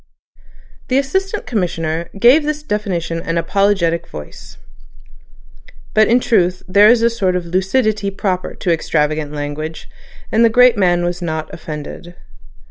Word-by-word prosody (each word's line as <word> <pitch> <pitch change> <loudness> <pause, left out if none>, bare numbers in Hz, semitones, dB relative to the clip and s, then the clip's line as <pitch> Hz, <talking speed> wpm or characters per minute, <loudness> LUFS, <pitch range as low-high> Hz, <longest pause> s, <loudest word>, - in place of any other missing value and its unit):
The 255 - +1
Assistant 380 +9 -1
Commissioner 170 -7 -2
gave 250 +8 +6
this 300 0 -3
definition 190 - -2
in - - -10
an 165 0 -1
apologetic 170 -1 +1
voice. 75 -1 -11 1.4
But 215 0 +4
in 240 +2 +4
truth 180 -7 +1
there 205 +3 +6
is 235 -1 +4
a 235 - +4
sort 190 -6 0
of 180 -1 -2
lucidity 200 +4 0
proper 190 -2 -3
to 175 - 0
extravagant 155 -2 -1
language, 150 +2 -5 0.4
and 225 - +3
the 230 - +6
great 250 +1 +5
man 175 -4 +2
was 175 +1 -3
not 160 -2 -4
offended. 160 +2 -8
185 Hz, 140 wpm, -17 LUFS, 165-225 Hz, 1.4 s, gave